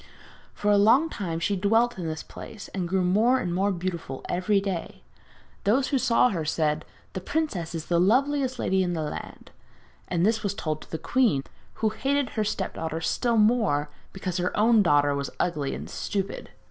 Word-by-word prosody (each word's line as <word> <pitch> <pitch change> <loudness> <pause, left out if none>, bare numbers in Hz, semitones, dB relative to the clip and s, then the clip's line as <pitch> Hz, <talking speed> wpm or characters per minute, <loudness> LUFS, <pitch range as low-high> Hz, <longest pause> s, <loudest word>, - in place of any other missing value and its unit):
For 210 - +1
a 205 - +5
long 265 +10 +5
time 165 -5 -3
she 200 +4 0
dwelt 225 +5 +2
in 165 -3 -2 0.2
peace, 215 - -9
and 185 -3 -3
grew 190 0 +1
more 215 +8 +3
and 175 -1 -2
more 195 +3 +1
beautiful 170 -7 -4
every 185 +3 +1
day. 195 -4 -4 0.6
Everyone 230 +7 +3
who 275 - +3
saw 250 0 +4
her 170 -7 -2
said 155 0 0 0.3
'The 185 - -4
princess 185 - -2
is 160 -1 -4
the 170 -1 +1
loveliest 260 +6 +2
lady 190 -4 +1
in 175 -1 0
the 160 -2 -2
land.' 150 - -7 0.6
And 175 0 +1
this 220 +1 +2
was 200 -1 -2
told 155 -4 -3
to - - -13
the 160 - -3
queen, 215 - +2 0.4
who - - +5
hated 275 +4 0
her 215 - -1
step 205 -2 -2
daughter 160 0 -3
still 235 +8 0
more 210 -10 +2 0.2
because 185 -1 -4
her 180 0 -1
own 225 +1 +5
daughter 145 -5 +3
was 140 0 -2
ugly 150 -6 -1
and - - -7
stupid. 195 -1 -4
190 Hz, 185 wpm, -26 LUFS, 165-225 Hz, 0.6 s, a